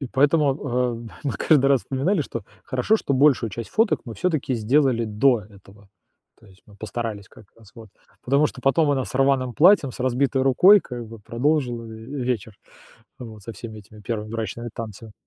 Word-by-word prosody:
И 135 - -4
поэтому, 140 +2 +2
э, 125 -4 -2 0.2
мы 140 - -1
каждый 135 +6 +3
раз 135 -2 +4
вспоминали, 150 +7 0
что 115 -6 -7 0.2
хорошо, 130 - +1
что 140 - -2
большую 130 -4 +3
часть 115 +4 -7
фоток 225 0 +2
мы 115 - -8
всё-таки 155 -6 -1
сделали 120 +1 +2
до 115 +3 +2
этого, 100 0 -18 0.5
то 115 - -19
есть 95 -2 -21
мы 105 - -17
постарались 110 -1 -5
как - - -17
раз 110 -3 -19
вот, 115 -2 -12 0.4
потому 140 +4 +3
что 130 - -11
потом 145 +2 +3
она 135 -2 0
с - - -9
рваным 135 -2 +1
платьем, 160 -4 +5
с - - -11
разбитой 130 +1 +1
рукой 180 +10 +6
как 120 -6 -8
бы 115 0 -11
продолжила 125 +1 -1
ве 115 +4 -7
вечер, 110 -4 -3 0.6
вот 110 -4 -10
со 115 - -8
всеми 110 -2 -9
этими 105 +1 -16
1 110 0 -4
брачными 115 +1 -5
танцами. 110 -1 -8
125 Hz, 185 wpm, -23 LUFS, 110-140 Hz, 0.6 s, рукой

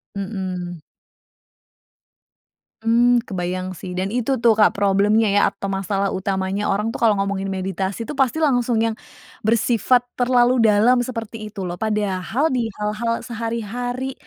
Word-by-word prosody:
Mhm. 185 -3 -4 2.0
Hmm, 240 +2 +4
kebayang 185 -1 -3
sih 180 +1 -7
dan 190 +4 -2
itu 250 +2 0
tuh, 230 -1 +4
Kak, 215 -1 +5
problemnya 205 +2 +3
ya 205 - +4
atau - - -8
masalah 195 0 -1
utamanya 190 +1 -1
orang 210 +3 0
tuh - - -7
kalau 220 -3 +4
ngomongin 195 0 -2
meditasi 190 +3 -3
pasti 270 +1 +1
langsung 245 -7 +2
yang 225 0 +1 0.5
bersifat 235 +2 +2
terlalu 245 0 +3
dalam 225 +3 +4
seperti 225 -3 -5
itu 195 -2 -6
loh. 175 - -3
Padahal 210 - 0
di 235 -3 0
hal-hal 215 +3 -2
sehari-hari, 240 +3 -4
215 Hz, 130 wpm, -21 LUFS, 195-240 Hz, 2.0 s, Kak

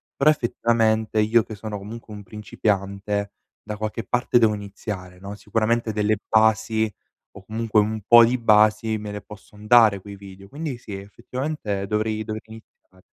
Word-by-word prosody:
Però 140 +2 +4
effettivamente, 115 -5 +1
io 110 +2 +4
che 110 0 -8
sono 105 0 -6
comunque 110 +2 -9
un 105 - -8
principiante, 100 -1 -2 0.3
da 105 - -5
qualche 110 +2 -4
parte 125 +1 +1
devo 110 -2 +4
iniziare, 100 -3 -7
no, 100 +2 -8
sicuramente 115 +2 -1
delle 105 0 +1
basi, 110 -1 +2 0.4
o 95 - -13
comunque 110 0 0
un 110 +1 0
po' 120 0 +8
di 125 +2 0
basi, 110 0 +3
me 105 -1 -7
le 105 - -6
posson 105 0 -14
dare 110 -4 +5
quei 100 0 -10
video. 100 0 -13
Quindi 145 -2 -5
sì, 110 -3 -10
effettivamente 105 0 -5
dovrei 110 +1 -1
dovrei 110 0 -5
iniziare. 110 -4 -16
110 Hz, 160 wpm, -23 LUFS, 105-115 Hz, 0.4 s, po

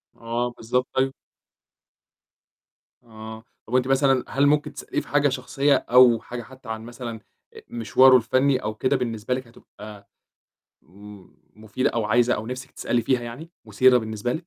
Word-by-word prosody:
آه، 120 +1 -3
بالضبط، 125 +2 -2
طيب 135 0 0 1.9
آه. 110 -1 -11 0.2
طَب 120 - -3
أنتِ 130 0 +2
مثلًا 135 -1 +2
هل 140 +1 +1
ممكن 150 +1 +1
تسأليه - - -4
في - - -16
حاجة 145 0 +2
شخصية، 135 +2 +1
أو 125 -2 +5
حاجة 120 0 -7
حتى 130 0 -14
عن 110 0 -4
مثلًا 120 -1 -7 0.3
آآ - - -13
مشوارُه 120 +3 +4
الفني 130 +3 +1
أو 105 0 -3
كده 130 +5 0
بالنسبة 115 -2 -2
لِك 130 -1 -5
هتبقى 105 -3 -14 0.7
م 100 +6 -14 0.3
مفيدة؟ 110 +4 -2
أو 115 -2 -2
عايزة 120 +3 +2
أو 110 - -6
نِفْسِك 130 +2 -7
تسألي 120 -1 -1
فيها 125 +2 +1
يعني، 120 +8 -9
مثيرة 125 +4 +4
بالنسبة 110 +1 -4
لِك؟ - - +1
120 Hz, 160 wpm, -23 LUFS, 110-130 Hz, 1.9 s, أو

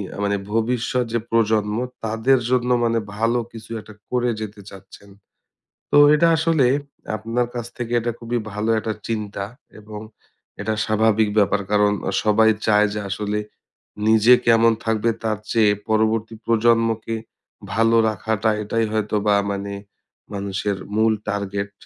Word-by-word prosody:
আ - - -9
মানে 100 0 +1 0.2
ভবিষ্যৎ 120 +2 0
যে 120 - +2
প্রজন্ম 110 -2 +1 0.3
তাদের 115 +4 +2
জন্য 125 -1 +1
মানে 115 0 +1 0.2
ভালো 115 +2 +1
কিছু 115 -1 -11
একটা 110 - -14 0.2
করে 125 -1 0
যেতে 105 -1 -7
চাচ্ছেন। 100 +1 -14 0.8
তো - - +5 0.2
এটা 170 +3 +4
আসলে, 160 -4 +2 0.5
আপনার 115 +3 -1
কাছ 120 -1 -3
থেকে 120 -1 -5
এটা 120 +1 -2
খুবই 120 +1 -2 0.2
ভালো 105 +2 -2
একটা 110 0 -2
চিন্তা 105 -3 -3 0.3
এবং, 105 0 -9 0.6
এটা 110 - -1
স্বাভাবিক 110 0 +2
ব্যাপার 100 0 +3
কারণ 105 0 +4 0.2
আ - - -1
সবাই 110 +1 +5 0.2
চায় 105 -1 +4
যে 105 - -3
আসলে, 105 +1 -2 0.7
নিজে 110 +2 +6
কেমন 115 0 +5
থাকবে 110 +1 +1
তার 110 -2 0
চেয়ে 110 -3 +4 0.2
পরবর্তী 110 +1 +1
প্রজন্মকে, 115 -1 +2 0.6
ভালো 115 +1 +3
রাখাটা 110 +1 -1
এটাই 115 +2 0
হয়তোবা 105 -1 +1 0.2
মানে 100 0 -4 0.6
মানুষের 100 0 -2 0.2
মূল 110 0 +3
টার্গেট, 100 0 -3
110 Hz, 135 wpm, -21 LUFS, 105-115 Hz, 0.8 s, নিজে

